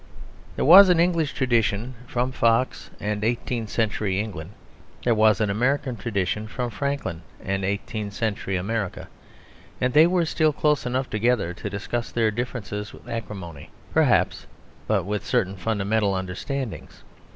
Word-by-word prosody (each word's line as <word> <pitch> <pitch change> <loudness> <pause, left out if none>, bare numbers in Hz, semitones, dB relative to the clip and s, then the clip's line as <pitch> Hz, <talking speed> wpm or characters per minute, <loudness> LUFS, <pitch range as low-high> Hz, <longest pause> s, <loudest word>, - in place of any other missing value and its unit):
There - - 0
was 185 +6 +10
an 175 -2 +4
English 170 -3 +2
tradition, 120 -2 0
from 125 +2 -1
Fox 115 0 +1
and 105 0 -2
eighteenth 115 -1 -1
century 105 -3 0
England; 95 -7 -5 0.5
there 120 - +3
was 110 -2 +4
an 105 -2 +1
American 130 +4 0
tradition 105 0 -2
from 120 +2 -4
Franklin 110 -7 -3 0.2
and 95 0 -2
eighteenth 100 +1 -3
century 100 -3 -2
America; 100 +1 -3 0.7
and 125 -1 0
they 155 +2 +7
were 175 -1 +2
still 155 -1 +2
close 150 -3 +1
enough 130 +1 -1
together 110 -5 +1
to - - -6
discuss 115 +4 -4
their 115 -2 +2
differences 105 -3 -4
with - - -14
acrimony, 100 -9 -6 0.2
perhaps, - - +2 0.4
but - - +2
with 105 +1 -2
certain 95 +1 0
fundamental 100 0 0
understandings. 100 +7 -5
110 Hz, 140 wpm, -24 LUFS, 100-125 Hz, 0.7 s, was